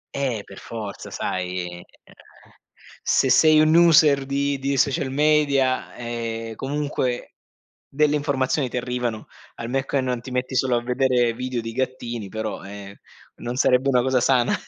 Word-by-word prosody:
Eh, 130 -7 -1
per 100 - -12
forza, 110 -4 -7
sai, 90 -1 -3
ehm, 90 0 -9 1.2
se 130 - +2
sei 155 +3 +6
un 155 0 +4
user 155 -5 +6
di 140 0 -1
di 135 +1 -1
social 135 0 +1
media, 140 -3 +2
ehm, 115 -1 -5
comunque, 135 -1 -3 0.6
delle 150 +1 +2
informazioni 140 -2 0
ti 125 - -4
arrivano, 125 -3 -3 0.3
al 115 - -6
me 135 +1 0
che 135 0 0
non 125 -2 -2
ti 130 - -9
metti 125 +1 -2
solo 125 0 +2
a 120 - -1
vedere 125 -1 +2
video 125 0 -3
di 115 0 -6
gattini, 120 -4 -3
però 110 +1 -5
ehm, 100 0 -9 0.4
non 120 +1 -5
sarebbe 130 +1 +3
una 125 -2 +3
cosa 130 0 +2
sana 125 -1 +3
125 Hz, 155 wpm, -23 LUFS, 115-140 Hz, 1.2 s, sei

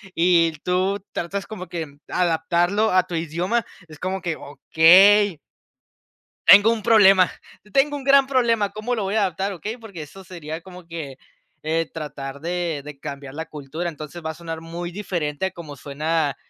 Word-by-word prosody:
y 165 -1 +3
tú 185 +3 -1
tratas 195 +3 -4
como 190 -4 -8
que 160 -4 -6
adaptarlo 175 +5 +1
a 185 0 +5
tu 180 -1 -6
idioma 170 +8 -1 0.2
es 155 -1 -13
como 190 +1 -3
que 175 -3 -3
okey. 185 +6 +5 1.1
Tengo 205 +3 +8
un 220 -2 -6
problema, 195 -4 +6 0.4
tengo 290 +4 +2
un 280 - -6
gran 275 0 +5
problema, 230 -6 +2
cómo 215 +4 -3
lo 220 - -2
voy 195 +2 -2
a 220 - +3
adaptar, 195 +1 -1
okey, 210 +6 -6
porque 210 -8 -10
eso 170 +6 -11
sería 165 -3 -7
como 180 0 -13
que, 155 -6 -7 0.5
eh, 165 +1 0
tratar 140 -3 -7
de 170 -3 -2
de 145 -1 -10
cambiar 140 -2 -7
la 160 +2 -5
cultura, 155 +3 -6
entonces 155 +1 -7
va 160 - -1
a - - -9
sonar 165 0 -7
muy 170 +2 -6
diferente 175 -5 -3
a 190 - -2
como 160 -5 -10
suena, 150 +2 -1
175 Hz, 170 wpm, -22 LUFS, 160-200 Hz, 1.1 s, Tengo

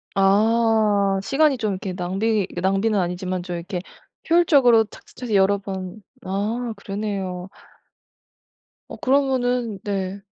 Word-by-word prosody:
아. 205 0 +3
시간이 285 +3 +2
좀 215 -3 -1
이렇게 185 0 -5
낭비 195 +3 -1
낭비는 195 +3 +1
아니지만 180 +1 -2
좀 175 -1 -5
이렇게 180 +2 -4 0.5
효율적으로 275 -10 +5
착착착 245 - -15
해서 210 - +1
여러 195 +1 +4
번 190 0 -7 0.2
아 220 +5 -2
그러네요. 195 -3 -4 1.4
어 - - -8
그러면은 250 -5 +1
네. 195 -1 -3
200 Hz, 260 characters per minute, -22 LUFS, 190-230 Hz, 1.4 s, 효율적으로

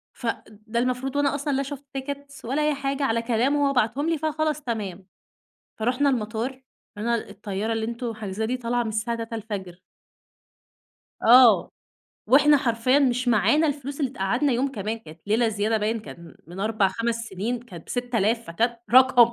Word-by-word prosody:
ف 245 - -9 0.2
ده 220 +2 -5
المفروض 255 +2 -1
وأنا 285 0 +2
أصلًا 285 0 -2
لا 275 +1 +1
شُفت 280 0 -7
tickets 280 0 -7
ولا 270 +6 0
أي 300 0 +2
حاجة، 275 0 -2
على 230 -3 +1
كلامه 260 +5 +2
هو 275 - 0
بعتهم 250 +6 +1
لي 330 - +1
فخلاص 310 0 -1
تمام. 205 -7 -4 0.7
فرُحنا 250 +6 +1
المطار 225 0 -2 0.5
قال 210 - -5
لنا 235 -1 0
الطيارة 205 +2 -3
اللي 225 0 -1
أنتوا 235 0 -4
حاجزينها 215 0 -4
دي 250 +3 -1
طالعة 245 0 -1
من 230 - -3
الساعة 220 +2 -2
3:00 230 0 -6
الفجر. 200 -5 -6 1.4
آه، 245 -1 +7 0.6
وإحنا 290 +5 +6
حرفيًا 255 0 +2
مش 250 -2 +1
معانا 295 +8 +4
الفلوس 285 0 -4
اللي 270 -3 0
تقعدنا 245 +5 0
يوم 265 +3 0
كمان، 215 -1 -3
كانت 160 -6 -14
ليلة 225 +3 +2
زيادة 215 +1 0
باين 220 +2 -1
كان 170 -7 -12
من 175 +3 -8
4، 215 -1 +2
5 230 +4 -1
سنين، 230 +1 -4
كانت 180 -9 -12
ب6000 235 -2 0
فكانت 230 +8 -1
رقم! 255 -2 +7
235 Hz, 170 wpm, -25 LUFS, 220-270 Hz, 1.4 s, آه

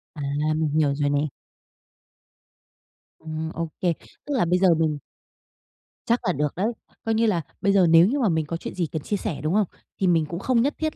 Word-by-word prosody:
À. 150 - -6 0.3
Mình 155 -1 0
hiểu 140 -2 +2
rồi 145 -1 +1
nè. 145 - +2 2.0
Ừm, 160 0 -5
ô 165 0 -3
kê. 175 -2 +2 0.3
Tức 290 - -3
là 200 - +3
bây 180 +2 +2
giờ 185 -3 +5
mình 155 -2 +1 1.1
Chắc 235 +1 +2
là 180 - +2
được 150 0 -1
đấy. 195 +5 0 0.4
Coi 225 - +1
như 230 - +3
là 185 -7 +2 0.2
bây 200 0 +3
giờ 185 -3 +5
nếu 165 +3 +7
như 280 +5 0
mà 230 -7 +2
mình 160 -2 +1
có 165 +2 -3
chuyện - - -7
gì 175 -3 0
cần 160 - -3
chia 205 - -2
sẻ, 190 -12 -4
đúng 155 +4 -1
không, 210 -3 +3 0.3
thì 190 - +2
mình 165 -3 +3
cũng 170 +3 -5
không 240 +3 +2
nhất 285 +4 +1
thiết 315 -1 -2
170 Hz, 220 wpm, -24 LUFS, 155-205 Hz, 2.0 s, nếu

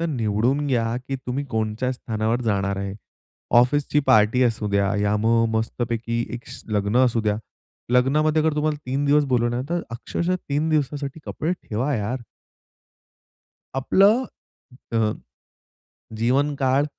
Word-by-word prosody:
तर 170 - 0
निवडून 125 +1 0
घ्या 115 -4 0
की 135 - -1
तुम्ही 130 +2 -4
कोणच्या 110 +3 -1
स्थानावर 110 -2 -1
जाणार 100 -2 0
आहे. 100 0 -4 0.6
ऑफिसची 145 +4 +3
पार्टी 110 +4 +5
असू 115 -3 +1
द्या, 100 -1 +1
या 105 0 +1
मग 115 +2 +3
मस्तपैकी 115 +1 -2
एक 120 - -8
स - - -10
लग्न 105 +1 0
असू 120 -2 +1
द्या. 105 -1 +1 0.6
लग्नामध्ये 150 +5 +3
अगर 160 -1 +1
तुम्हाला 150 0 +1
3 135 +3 -1
दिवस 145 +1 +4
बोलवलं 120 0 +1
तर 175 0 0
अक्षरशः 170 +9 -2
3 145 +3 0
दिवसासाठी 145 0 -1
कपडे 160 +3 -2
ठेवा 135 -4 -2
यार. 115 +4 -3 1.5
आपलं 200 - +4 0.7
अ, 110 -2 +2 1.1
जीवनकाळ 135 +2 +2
125 Hz, 130 wpm, -23 LUFS, 110-145 Hz, 1.5 s, पार्टी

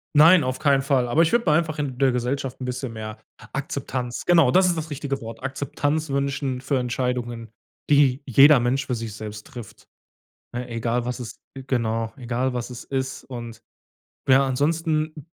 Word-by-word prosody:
Nein, 160 +3 +7
auf 130 0 -2
keinen 140 -3 +3
Fall, 135 -3 +2
aber 155 +7 +4
ich 165 - +1
würde 235 -8 +2
mir - - +5
einfach 155 -2 -2
in 135 -4 -3
der 135 0 +3
Gesellschaft 125 +2 -2
'n - - -3
bisschen 125 -1 -4
mehr 110 -1 -6 0.3
Akzeptanz 125 -2 -4
genau, 165 -7 +5
das 185 +3 +5
ist 175 - +1
das 160 0 -5
richtige 140 -1 -3
Wort, 115 0 -8
Akzeptanz 145 +3 -2
wünschen 140 -1 -1
für 135 +1 0
Entscheidungen, 120 -2 -2 0.4
die 140 -2 +4
jeder 135 +3 +7
Mensch 125 +3 0
für 125 - -2
sich 115 -3 -4
selbst 110 0 -8
trifft, 120 -5 -11 0.7
ne, 125 0 -5
egal 115 +1 -1
was 125 +1 -4
es 120 -3 -8 0.3
genau, 115 -3 -1
egal 125 0 -2
was 125 0 -3
es 125 -1 -9
ist, 130 0 -3
und 120 -3 -8 0.7
ja, 135 +1 +5
ansonsten 155 +2 -1
130 Hz, 175 wpm, -24 LUFS, 120-145 Hz, 0.7 s, Nein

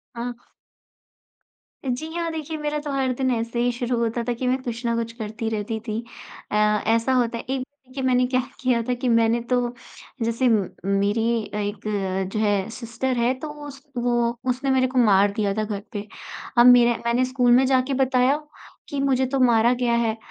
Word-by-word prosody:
हाँ। 240 +1 -4 1.5
जी 265 +6 -3
हाँ, 335 -1 -2
देखिए 315 0 -5
मेरा 300 0 -2
तो 295 -1 -5
हर 270 -2 0
दिन 260 0 0
ऐसे 230 0 -2
ही 245 0 +2
शुरू 240 0 -2
होता 235 0 -1
था 245 - +1
कि 250 +2 -3
मैं 255 +1 +1
कुछ 235 -1 -5
ना 235 0 +1
कुछ 230 0 -2
करती 220 0 -4
रहती 220 +1 -3
थी। 215 +1 -2 0.5
अ, - - -1 0.3
ऐसा 230 +3 +2
होता 235 -2 +1
है - - -6
एक 265 -1 -1 0.3
देखिए 260 +1 -6
मैंने 250 -1 +3
क्या 255 0 +1 0.2
किया 250 -3 +2
था 250 - -1
कि 245 0 -2
मैंने 230 0 +3
तो 245 -1 +1 0.5
जैसे 230 +3 +1
म 210 -4 +2 0.2
मेरी 200 +3 +1 0.3
एक 205 0 -2 0.6
जो 215 - -1
है 205 -2 +1
सिस्टर 240 +2 -3
है 240 +2 +2
तो 310 - -5
वो 295 0 -10
उस 275 -1 -10 0.2
वो 240 -1 0
उसने 260 +2 -1
मेरे 260 -1 +3
को 255 - -4
मार 200 -3 +5
दिया 205 -2 -1
था 215 +1 -1
घर 210 -2 -4
पे। 205 0 -5 0.5
अब 240 - +7
मेरा 240 -1 +7
मैंने 240 +2 +2
स्कूल 250 -1 +2
में 260 +2 +6
जाके 260 +1 +2
बताया 260 +1 +3 0.5
कि 285 - -3
मुझे 265 -1 +2
तो 270 +1 -1
मारा 240 -1 +4
गया 245 -1 0
है। 225 -1 0
240 Hz, 200 wpm, -23 LUFS, 230-260 Hz, 1.5 s, अब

